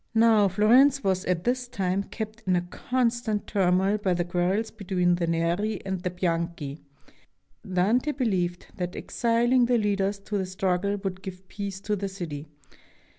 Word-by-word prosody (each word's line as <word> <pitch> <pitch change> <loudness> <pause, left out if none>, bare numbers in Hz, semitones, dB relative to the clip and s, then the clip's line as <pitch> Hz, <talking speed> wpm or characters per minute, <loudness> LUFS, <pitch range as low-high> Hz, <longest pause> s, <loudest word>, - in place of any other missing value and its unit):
Now 225 -2 +5
Florence 245 +8 +4
was 190 -1 0
at 180 -2 0
this 250 +2 0
time 195 -5 -1
kept 220 0 -6
in 185 - +3
a 175 - +2
constant 235 +2 -1
turmoil 190 +1 +2
by 190 -3 +1
the 175 0 -1
quarrels 185 +5 0
between 180 -4 0
the 175 -1 0
Neri 170 +6 0
and 190 -2 -3
the 180 - -1
Bianchi. 170 -4 -2 0.9
Dante 220 +11 +2
beheved 185 -10 -1
that 180 0 -3
exiling 240 +1 +2
the 245 -1 +3
leaders 200 -2 0
of 200 +1 -3
the 190 - -2
struggle 185 +1 0
would 190 -1 -3
give 190 -1 -9
peace 200 -1 -5
to 210 +1 -1
the 200 0 -3
city. 160 -6 -6
195 Hz, 160 wpm, -26 LUFS, 180-220 Hz, 0.9 s, Now